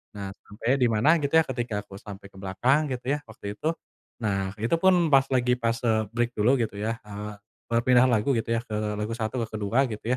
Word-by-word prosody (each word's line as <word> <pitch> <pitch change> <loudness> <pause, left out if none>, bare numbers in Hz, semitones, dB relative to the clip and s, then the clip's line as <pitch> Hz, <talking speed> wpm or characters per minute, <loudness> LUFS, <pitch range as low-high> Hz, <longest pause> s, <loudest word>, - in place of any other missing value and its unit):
nah 100 -1 -5
sampai 115 +5 -1
dimana 120 +6 +4
gitu 140 +2 -2
ya - - +4
ketika 120 -5 -2
aku - - -15
sampai 100 -1 -10
ke 95 - -18
belakang 125 +11 +1
gitu 125 -1 -4
ya, 150 - -1
waktu 105 -2 -7
itu. 155 - -3 0.6
Nah, 95 -2 -1
itu 115 - 0
pun 190 0 +6 0.2
pas 135 0 +6
lagi 125 -1 +3
pas, 115 -1 0
eee, 110 -1 +3
break 120 0 +1
dulu 120 +6 +4
gitu 110 -3 -2
ya, 115 +1 -1
eee, 105 0 -6 0.4
berpindah 125 +2 +4
lagu 120 +4 +2
gitu 115 - -3
ya - - -2
ke 110 - -8 0.3
lagu 105 +2 -2
1 110 +2 -3
ke - - -14
ke-2 105 +4 0
gitu 105 - -7
115 Hz, 215 wpm, -26 LUFS, 105-125 Hz, 0.6 s, pun